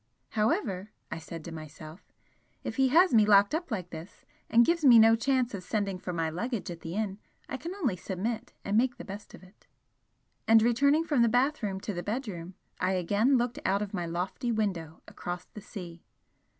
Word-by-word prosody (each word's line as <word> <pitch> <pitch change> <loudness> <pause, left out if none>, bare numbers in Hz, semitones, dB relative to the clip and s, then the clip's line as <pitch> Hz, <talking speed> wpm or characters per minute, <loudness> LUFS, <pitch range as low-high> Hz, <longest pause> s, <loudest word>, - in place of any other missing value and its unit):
"However," 215 - 0 0.2
I - - -4
said 165 0 -9
to 170 - -7
myself 155 +2 -10 0.6
"if 225 - -5
he 265 0 +4
has 335 +4 +5
me 220 -2 +7
locked 205 +1 +5
up 340 +2 -2
like 185 -7 -4
this, 160 +4 -10 0.2
and 235 +1 +6
gives 335 -1 +1
me 250 -4 +8
no 225 0 +7
chance 255 0 +1
of 200 - -4
sending 195 -1 -2
for 180 - -5
my 165 -2 -1
luggage 205 +4 -3
at 170 - -8
the 165 +2 -6
inn, 205 -2 -2 0.3
I 265 - -4
can 335 +8 -6
only 275 - 0
submit 215 +6 -4
and 200 - 0
make 245 +2 +2
the - - -9
best 200 +1 -9
of - - -16
it." 185 +2 -20 0.8
And 225 0 +6
returning 280 +7 +3
from 295 -6 +1
the 235 - +5
bathroom 245 -5 +1
to 205 - -4
the 175 - -3
bedroom, 195 -6 -5 0.2
I 185 +1 +1
again 205 +9 +2
looked 240 0 -1
out 200 +2 +1
of 205 - -7
my 175 -3 -2
lofty 180 +8 -2
window 185 -8 -2
across 175 0 -6
the 210 - -11
sea. 175 -4 -9
210 Hz, 200 wpm, -29 LUFS, 180-245 Hz, 0.8 s, me